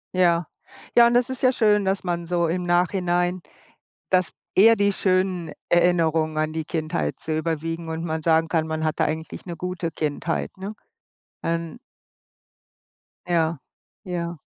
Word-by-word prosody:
Ja. 175 Hz, -2 st, +3 dB, 0.5 s
Ja, 235 Hz, 0 st, +8 dB
und 240 Hz, -, +1 dB
es 245 Hz, +1 st, +3 dB
ist 260 Hz, -, -5 dB
ja 255 Hz, -, +5 dB
schön, 210 Hz, -4 st, +3 dB
dass 190 Hz, 0 st, 0 dB
man 175 Hz, -2 st, -2 dB
so 170 Hz, -1 st, +1 dB
im 180 Hz, +2 st, -1 dB
Nachhinein 175 Hz, 0 st, +1 dB, 0.7 s
dass 185 Hz, -2 st, +2 dB, 0.2 s
eher 225 Hz, +4 st, +7 dB
die 200 Hz, -1 st, +2 dB
schönen 185 Hz, -3 st, 0 dB, 0.2 s
Erinnerungen 165 Hz, -3 st, +2 dB
an 155 Hz, 0 st, 0 dB
die 160 Hz, 0 st, -3 dB
Kindheit 155 Hz, -, -2 dB
so 160 Hz, -, -5 dB
überwiegen 165 Hz, +1 st, -3 dB
und 160 Hz, 0 st, -3 dB
man 160 Hz, -1 st, -2 dB
sagen 160 Hz, 0 st, +3 dB
kann, 160 Hz, -2 st, +1 dB
man 160 Hz, 0 st, -2 dB
hatte 155 Hz, -1 st, +1 dB
eigentlich 160 Hz, +1 st, -4 dB
'ne 175 Hz, -2 st, -5 dB
gute 180 Hz, -1 st, -3 dB
Kindheit, 155 Hz, +2 st, -2 dB
ne? 195 Hz, +3 st, -6 dB, 0.7 s
Ähm. 165 Hz, +4 st, -2 dB, 1.5 s
Ja, 165 Hz, -3 st, +1 dB, 0.5 s
ja. 170 Hz, -2 st, -3 dB
170 Hz, 150 wpm, -24 LUFS, 160-185 Hz, 1.5 s, Ja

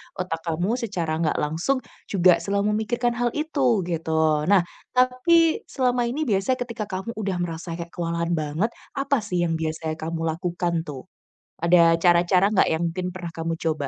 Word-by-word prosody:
otak 180 Hz, -3 st, -3 dB
kamu 170 Hz, +4 st, 0 dB
secara 185 Hz, -9 st, -2 dB
nggak 160 Hz, -2 st, +1 dB
langsung 165 Hz, -, 0 dB, 0.3 s
juga 185 Hz, -2 st, +5 dB
selalu 200 Hz, 0 st, -1 dB
memikirkan 240 Hz, +3 st, 0 dB
hal 245 Hz, 0 st, +2 dB
itu 275 Hz, -, +1 dB
gitu. 165 Hz, -1 st, -2 dB, 0.4 s
Nah 195 Hz, -2 st, +5 dB, 0.3 s
tapi 255 Hz, +7 st, +4 dB
selama 250 Hz, -2 st, 0 dB
ini 275 Hz, +6 st, -2 dB
biasanya 220 Hz, 0 st, +1 dB
ketika 230 Hz, -3 st, -5 dB
kamu 190 Hz, +4 st, -4 dB
udah 195 Hz, -2 st, -1 dB
merasa 165 Hz, 0 st, -5 dB
kayak 170 Hz, 0 st, -7 dB
kewalahan 170 Hz, 0 st, -2 dB
banget, 155 Hz, +6 st, 0 dB, 0.3 s
apa 275 Hz, 0 st, +1 dB
sih 180 Hz, -2 st, 0 dB
yang 165 Hz, -, 0 dB
biasanya 160 Hz, 0 st, -3 dB
kamu 165 Hz, +1 st, -4 dB
lakukan, 175 Hz, +1 st, -2 dB
tuh? 135 Hz, -3 st, -6 dB, 0.6 s
Ada 170 Hz, -1 st, +5 dB
cara-cara 175 Hz, +1 st, +4 dB
nggak 195 Hz, -, +4 dB
yang 160 Hz, +1 st, 0 dB
mungkin 180 Hz, +2 st, -3 dB
pernah 180 Hz, -2 st, -7 dB
kamu 165 Hz, 0 st, -3 dB
coba? 155 Hz, -3 st, 0 dB
180 Hz, 165 wpm, -24 LUFS, 165-230 Hz, 0.6 s, juga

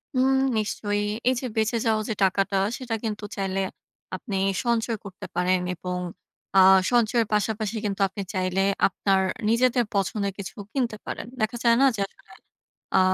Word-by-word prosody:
হুম 260 Hz, +1 st, +4 dB, 0.2 s
নিশ্চয়ই। 205 Hz, -1 st, -1 dB, 0.3 s
এই -, -, +3 dB
যে -, -, -4 dB
বেঁচে 220 Hz, +2 st, +2 dB
যাওয়া 220 Hz, -1 st, +2 dB
যে -, -, +1 dB
টাকাটা, 195 Hz, +1 st, +2 dB, 0.2 s
সেটা 245 Hz, -3 st, -3 dB
কিন্তু 215 Hz, -2 st, -3 dB
চাইলে 195 Hz, -1 st, -1 dB, 0.5 s
আপনি 200 Hz, -6 st, -4 dB, 0.3 s
সঞ্চয় 230 Hz, -1 st, +1 dB
করতে 190 Hz, -2 st, -9 dB
পারেন। 180 Hz, +1 st, +2 dB, 0.2 s
এবং 180 Hz, +1 st, -4 dB, 0.6 s
আ -, -, +9 dB, 0.3 s
সঞ্চয়ের 235 Hz, -1 st, +3 dB
পাশাপাশি 215 Hz, +1 st, 0 dB
কিন্তু 200 Hz, 0 st, -2 dB
আপনি 200 Hz, +1 st, -6 dB
চাইলে 185 Hz, 0 st, 0 dB, 0.3 s
আপনার 195 Hz, 0 st, +1 dB, 0.3 s
নিজেদের 245 Hz, +1 st, +3 dB
পছন্দের 200 Hz, +1 st, 0 dB
কিছু 200 Hz, -, -7 dB, 0.2 s
কিনতে 240 Hz, -6 st, -1 dB
পারেন। -, -, -5 dB
দেখা 220 Hz, +2 st, 0 dB
যায় 235 Hz, -1 st, +5 dB
না 275 Hz, -, +7 dB
যে 200 Hz, -, -3 dB
আসলে -, -, -23 dB, 0.7 s
আ -, -, +6 dB
210 Hz, 155 wpm, -25 LUFS, 195-230 Hz, 0.7 s, আ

